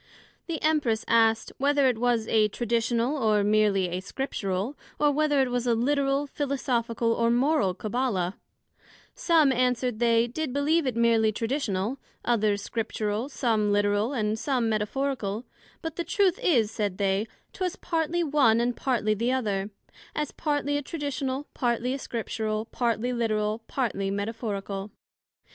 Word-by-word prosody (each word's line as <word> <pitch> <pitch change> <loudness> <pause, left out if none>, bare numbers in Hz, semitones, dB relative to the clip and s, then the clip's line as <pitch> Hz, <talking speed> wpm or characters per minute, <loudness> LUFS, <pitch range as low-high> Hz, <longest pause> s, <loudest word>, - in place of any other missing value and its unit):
The 330 -2 -3
Empress 290 -8 +1
asked, 225 -1 +3
Whether 285 0 +3
it 250 -4 +2
was 235 -2 +1
a 215 -1 +4
Traditional, 235 +4 0
or 215 -5 +2
meerly 205 -2 +3
a 180 +1 -2
Scriptural, 200 +1 -3 0.2
or 295 -1 +3
whether 295 -1 +2
it 260 -2 0
was 245 0 -1
a 235 - +3
Literal, 275 +3 +1
Philosophical, 245 -5 -1
or 230 0 +1
Moral 245 - +2
Cabbala 210 -5 -1 0.8
some, 330 - +3
answered 250 -2 0
they, 230 -1 +4
did 270 +4 -3
believe 290 +2 +2
it 250 - -1
meerly 230 -2 +3
Traditional, 225 -1 -2 0.3
others 215 -4 +1
Scriptural, 220 +2 -2
some 220 -6 +1
Literal, 205 +3 +2
and 215 -4 -1
some 250 -2 0
Metaphorical: 220 0 -1 0.4
but 325 -1 -5
the 345 - -1
truth 380 +2 +1
is, 230 - +3
said 205 -4 -2
they, 200 +2 +1 0.3
'twas 370 -1 -2
partly 335 0 -1
one, 275 -7 +4
and 240 +1 0
partly 230 -5 0
the 230 +4 0
other; 205 -6 -1 0.5
as 300 -1 -2
partly 290 -2 -1
a - - -2
Traditional, 285 -2 -3
partly 240 +1 0
a 275 - -3
Scriptural, 220 -3 -3
partly 240 +1 -1
Literal, 215 -2 0
partly 205 -7 -1
Metaphorical. 200 -1 -3
235 Hz, 145 wpm, -27 LUFS, 215-275 Hz, 0.8 s, a